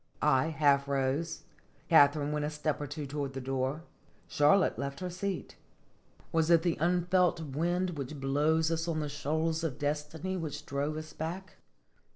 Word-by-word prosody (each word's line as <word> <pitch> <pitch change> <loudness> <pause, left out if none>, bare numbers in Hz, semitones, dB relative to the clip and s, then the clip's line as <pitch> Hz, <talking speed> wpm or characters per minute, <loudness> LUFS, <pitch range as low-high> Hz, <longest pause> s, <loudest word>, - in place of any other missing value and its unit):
I 130 +2 +4
half 140 -3 +3
rose; 140 +4 -1 0.4
Katharine 145 -2 +5
went 150 0 -1
a 150 - -1
step 150 0 -2
or 145 - -3
two 145 +1 -5
toward 140 -1 -4
the 135 - -4
door; 135 +4 -2 0.4
Charlotte 150 +7 +3
left 140 0 -4
her 180 -1 -4
seat. 190 +1 -4 0.7
Was 165 0 +2
it 165 -1 +5
the 175 -2 +1
unfelt 175 +1 +2
wind 170 +5 -1
which 145 -2 -6
blows 150 +4 +2
us 165 +1 -1
on 160 -2 -1
the 150 - -2
shoals 160 +3 -1
of 155 -6 -2
destiny 150 +5 -2
which 150 -3 -5
drove 145 +2 -2
us 155 0 -7
back 180 +4 -6
155 Hz, 165 wpm, -31 LUFS, 145-165 Hz, 0.7 s, Katharine